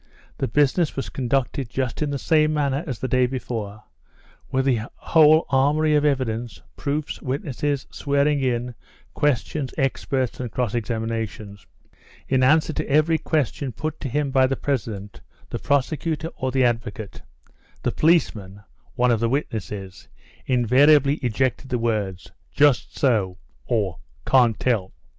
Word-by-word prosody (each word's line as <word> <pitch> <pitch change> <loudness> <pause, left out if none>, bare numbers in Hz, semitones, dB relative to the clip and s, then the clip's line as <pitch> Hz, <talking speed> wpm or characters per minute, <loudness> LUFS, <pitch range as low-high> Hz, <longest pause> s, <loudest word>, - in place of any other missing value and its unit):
The - - 0
business 145 +6 +2
was 135 - -4
conducted 130 0 -1
just 130 +1 -3
in 150 - 0
the 140 - -2
same 155 +1 +2
manner 140 0 0
as 130 -5 -3
the 130 - -3
day 130 -1 +3
before, 110 -5 -5 0.7
with 130 0 0
the 120 -4 0
whole 155 0 +5
armoury 150 +3 +3
of 150 -1 +3
evidence, 120 -5 -1 0.2
proofs, 145 +1 -3
witnesses, 140 0 -2
swearing 140 0 +1
in, 125 -1 -1 0.4
questions, 145 0 -1
experts, 135 -1 -1
and 125 -3 -4
cross 125 -5 -1
examinations. 110 -3 -4 0.6
In 130 -1 +2
answer 155 +4 +4
to - - -3
every 155 +3 +3
question 140 -3 -1
put 155 +5 -4
to 135 - -4
him 140 +2 -1
by 130 -1 +4
the 135 - -1
president, 110 -8 -4 0.3
the - - -3
prosecutor, 155 +3 -1
or 130 0 -2
the 130 0 +2
advocate, 115 -3 -2 0.6
the - - +1
policeman 105 - +1 0.3
(one 125 -1 +3
of 115 - +2
the 115 0 +1
witnesses) 105 -8 -4 0.4
in 125 -2 +2
variably 140 +3 +5
ejected 130 +2 -1
the 125 - 0
words: 105 -6 -2 0.2
"just 145 -3 +2
so," 105 -9 +1 0.3
or 100 -8 -1 0.3
"Can't 120 -4 +4
tell." 110 -7 0
130 Hz, 145 wpm, -23 LUFS, 115-145 Hz, 0.7 s, whole